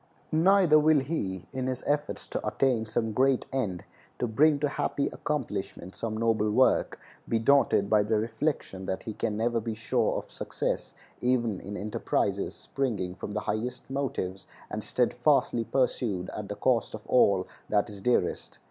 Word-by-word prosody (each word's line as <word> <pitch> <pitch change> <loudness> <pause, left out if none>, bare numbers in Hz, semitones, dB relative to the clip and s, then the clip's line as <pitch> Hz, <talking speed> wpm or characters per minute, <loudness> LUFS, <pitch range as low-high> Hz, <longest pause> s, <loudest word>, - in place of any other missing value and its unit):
Neither 170 -1 +5
will 155 -1 +4
he, 95 - -3
in 130 0 -2
his 130 -1 -3
efforts 145 +1 -1
to - - -3
attain 125 -5 +1
some 110 0 -1
great 130 +3 +2
end, 105 -10 -2 0.3
to - - 0
bring 145 +7 +4
to 150 - +3
happy 145 0 -1
accomplishment 105 - -4
some 110 -1 -3
noble 110 -2 +2
work, 130 +5 +3 0.3
be 115 - +2
daunted 120 -4 +4
by 105 0 +4
the 110 +1 +1
reflection 110 -4 -2
that 95 - -3
he 110 - -5
can 105 0 -2
never 115 +1 +1
be 110 0 -4
sure 110 -1 0
of - - -7
success - - -3 0.2
even 120 -5 +1
in 105 +1 -6
enterprises 105 0 -1
springing 105 -10 -2
from 100 +2 -7
the 105 - 0
highest 120 +5 -3
motives 105 -9 -3 0.2
and - - -3
steadfastly 115 -1 +2
pursued 110 -8 0
at 105 -1 -6
the 105 - -3
cost 115 +1 +1
of 110 - -11
all 100 -6 +4 0.2
that 105 -1 +2
is 100 -2 -9
dearest. 125 +4 0
115 Hz, 165 wpm, -28 LUFS, 105-135 Hz, 0.3 s, Neither